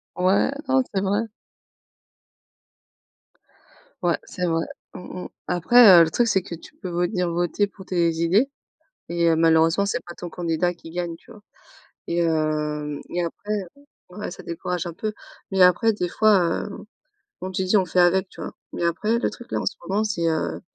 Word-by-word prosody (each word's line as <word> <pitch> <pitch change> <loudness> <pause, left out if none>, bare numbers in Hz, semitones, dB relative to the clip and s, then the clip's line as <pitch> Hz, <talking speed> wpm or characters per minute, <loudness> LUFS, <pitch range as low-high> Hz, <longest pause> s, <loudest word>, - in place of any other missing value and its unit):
Ouais, 185 +7 +2 0.2
non 265 0 +4
c'est 195 - +1
vrai. 200 +3 +1 2.8
Ouais - - +2
c'est 180 -3 -4
vrai. 165 0 0 0.3
Mmh 180 0 -7
mh. - - -8 0.2
Après, 185 +2 +7
heu, - - +8
le 160 - 0
truc 235 +8 +1
c'est 195 -3 +2
que 175 -1 -7
tu 165 - -15
peux 185 - -4
venir 175 +1 0
voter 175 +4 0
pour 190 -1 -14
tes 170 -2 +1
idées 180 +11 +2 0.6
et 170 0 +1
heu, 165 - +4
malheureusement 165 +4 +3
c'est - - -1
pas 175 - -8
ton 175 - -8
candidat 170 +1 -1
qui 165 -1 -12
gagne, 175 -1 -3
tu 235 - -19
vois 215 - -14 0.7
et 170 0 0
hem 150 -2 -1
et 175 - -1
après 205 +5 -5 0.6
ouais, 195 +4 -6
ça - - -10
décourage 175 +1 -4
un 170 - -5
peu, 215 +5 -3 0.4
mais 190 -1 0
après 180 +5 +5
des 180 -4 -2
fois, 195 -5 +3
heu, 210 - -7 0.7
comme 185 0 -5
tu 190 - -1
dis 185 +3 +3
on 190 - +4
fait 180 +1 +1
avec, 185 +2 +3
tu - - -13
vois - - -5 0.2
mais 170 - -3
après 210 +7 +1
le - - 0
truc 240 - -11
là - - 0
en - - -4
ce - - -1
moment 200 +4 0
c'est 190 -6 -1
heu 160 -1 -2
180 Hz, 190 wpm, -23 LUFS, 170-200 Hz, 2.8 s, heu